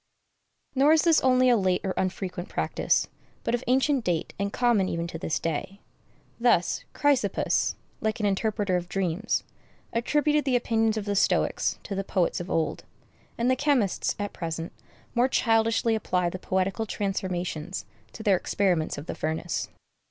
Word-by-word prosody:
Nor 285 +3 +5
is 320 - +4
this 330 -2 +5
only 255 -1 +4
a 245 - +6
late 185 -4 +1
or 190 -2 -1
unfrequent 185 -1 -3
practice, - - +1 0.4
but - - -1
of 240 +1 0
ancient 265 +1 +2
date 175 -5 -1
and 200 0 -1
common 235 -6 +2
even 170 0 -2
to 165 -1 -6
this 160 - -1
day. 165 +5 -3 0.6
Thus 235 -8 +2
Chrysippus, 285 -3 +1 0.2
like 220 0 -1
an 210 - 0
interpreter 205 -1 +1
of 175 0 -5
dreams, 195 +2 -1 0.5
attributed 295 +5 +2
the 265 -2 +1
opinions 225 -2 +1
of 210 - -3
the 205 -1 -1
Stoics - - +1
to 205 - -5
the 195 0 -2
poets 185 -2 0
of 175 +1 -6
old; 160 - -1 0.5
and 235 - +1
the 255 - +4
chemists, 260 -8 +1
at 205 0 -4
present, 165 0 -4 0.4
more 240 +2 +3
childishly 225 -2 +2
apply 180 -5 0
the 185 - -6
poetical 190 +4 -1
transformations 185 -3 -3 0.3
to 220 - -8
their 200 -4 +4
experiments 180 -4 0
of 145 - -7
the - - -4
furnace. 160 +2 -2
200 Hz, 160 wpm, -27 LUFS, 180-240 Hz, 0.6 s, a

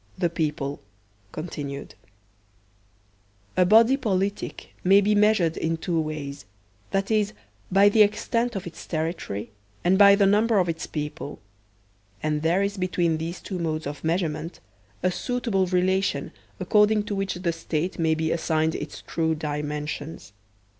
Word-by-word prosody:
The 175 -3 0
People 150 -3 -2 0.5
(Continued) 145 -4 -6 1.6
A 180 -1 +4
BODY 230 +6 +6
politic 200 -5 -2
may 195 +2 +6
be 205 +1 +2
measured 205 -6 +3
in 165 0 -1
two 165 0 -1
ways, 145 -4 -5 0.5
viz, 205 +1 +1 0.4
by 195 +2 +6
the 215 +2 +5
extent 230 +3 +2
of 195 - -4
its 170 - -9
territory, 155 - -3 0.3
and 185 +2 +3
by 200 -1 +9
the 200 0 +3
number 210 +3 +3
of 180 -2 +3
its 165 -1 -3
people; 150 -1 -5 0.9
and 150 -1 0
there 170 +5 +2
is 200 +1 -2
between 175 -3 +1
these 165 +2 -5
two 185 -3 -5
modes 155 -2 -2
of 145 +1 -6
measure 170 +2 +1
ment 155 +3 -7 0.4
a 185 - +3
suitable 230 -4 -1
relation 185 +2 +1 0.3
according 210 0 +3
to 210 0 -4
which 195 -1 -2
the 175 -1 -1
State 165 +2 -3
may 160 -1 +2
be 160 0 -1
assigned 160 -1 +1
its 150 - -6
true 160 -1 0
dimensions. 150 -3 -4
175 Hz, 145 wpm, -25 LUFS, 155-200 Hz, 1.6 s, by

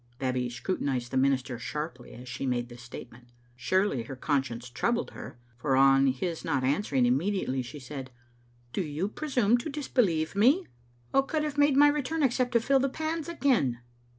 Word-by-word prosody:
Babbie 130 -2 -1
scrutinised 120 -1 -2
the 130 - 0
minister 130 -2 +1
sharply 140 0 -6
as 125 +1 -11
she 135 +2 -4
made 120 -1 -1
this 120 0 -11
statement. 120 0 -11 0.3
Surely 165 - +1
her 115 +4 -7
conscience 130 -3 -1
troubled 235 - -1
her, - - -9 0.2
for 135 +1 +1
on 135 0 +5
his 160 +6 -2
not 140 -5 0
answering 135 -2 +1
immediately 135 +1 0
she 125 +4 -8
said, 135 -1 -7 0.6
"Do - - 0
you 155 +3 -2
presume 245 -2 +1
to 275 - -5
disbelieve 210 - 0
me? 270 - +4 0.5
What 270 0 +3
could 310 +1 0
have 295 -1 -3
made 290 -1 +4
me 290 +1 +8
return 300 +2 -1
except 255 -1 +1
to 235 - +5
fill 270 +4 +3
the 270 +1 +1
pans 315 +3 -3
again?" 235 - +1
150 Hz, 175 wpm, -28 LUFS, -, 0.6 s, me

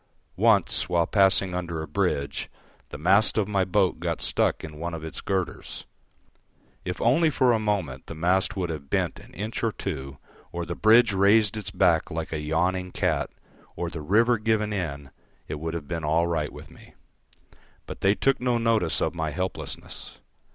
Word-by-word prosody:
Once, 100 -3 +3
while 85 -1 +2
passing 95 -2 +4
under 85 -2 -3
a - - -7
bridge, 70 0 -1 0.4
the - - -7
mast 100 +9 +3
of 105 -3 +2
my 100 -2 +1
boat 95 -3 +1
got 85 -1 -2
stuck - - 0
in 75 -1 -8
one 85 0 -3
of 80 - -7
its 80 - -6
girders. 95 -3 -3 1.0
If 90 - -4
only 150 +8 +4
for 130 -4 +3
a 110 - +2
moment 95 -12 -2
the 80 - -7
mast 95 +6 +1
would 90 -3 -1
have 70 -3 -7
bent - - -1
an - - -16
inch 105 +6 -4
or 115 - +2
two, 70 -10 -5 0.3
or 85 0 -4
the 85 - -4
bridge 110 +3 +5
raised 100 +2 +4
its 105 -4 -5
back 90 -4 +2
like 80 0 -4
a 75 - -2
yawning 90 +4 0
cat, - - 0 0.5
or 85 -1 -3
the 80 - -6
river 115 +8 +3
given 105 -1 0
in, 70 -8 -4 0.4
it 75 - -5
would 80 +1 -4
have 80 -4 -5
been 85 -2 -4
all 80 +3 +2
right 80 -4 -1
with - - -12
me. - - -17 0.9
But - - -8
they 100 +1 +4
took 135 +2 +1
no 125 -1 +1
notice 115 -7 +1
of - - -1
my 80 -2 -2
helplessness. 95 +5 -6
90 Hz, 185 wpm, -26 LUFS, 80-105 Hz, 1.0 s, bridge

